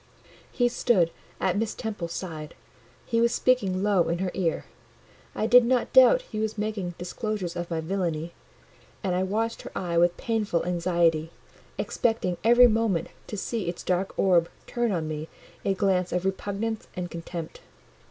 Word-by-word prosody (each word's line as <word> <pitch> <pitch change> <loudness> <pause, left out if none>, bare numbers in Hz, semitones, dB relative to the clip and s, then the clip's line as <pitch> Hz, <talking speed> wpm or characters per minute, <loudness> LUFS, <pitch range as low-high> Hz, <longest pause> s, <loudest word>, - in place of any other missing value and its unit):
He 245 -2 +2
stood 215 -8 +2 0.3
at 185 +2 +1
Miss 225 -1 -2
Temple's 205 -7 -4
side; 155 -5 -6 0.5
he 230 -1 +1
was 235 0 +4
speaking 200 -9 +1
low 200 -4 +3
in 170 - 0
her 185 0 -2
ear: 175 -4 -1 0.7
I - - 0
did 245 +2 +7
not 245 +1 +1
doubt - - +7
he 215 - -6
was 220 0 -2
making 205 -5 -3
disclosures 185 -1 -4
of 175 0 -4
my 165 -2 -1
villainy; 170 -2 -2 0.7
and 190 -2 0
I 180 - +1
watched 220 +5 -1
her - - -9
eye 170 -2 0
with 175 0 +3
painful 215 -8 -1
anxiety, 170 -2 +1 0.5
expecting 225 -7 0
every 240 +2 +7
moment 215 -7 +1 0.2
to 210 - -5
see 200 -2 -2
its 175 - -6
dark 185 +1 -1
orb 175 -3 +3 0.2
turn 240 -2 -1
on 165 -4 -1
me 155 0 -5 0.3
a 195 - +1
glance 185 -2 +1
of 180 +1 -1
repugnance 205 +3 -2
and 180 -1 -4
contempt. 165 -1 -7
190 Hz, 160 wpm, -26 LUFS, 175-220 Hz, 0.7 s, did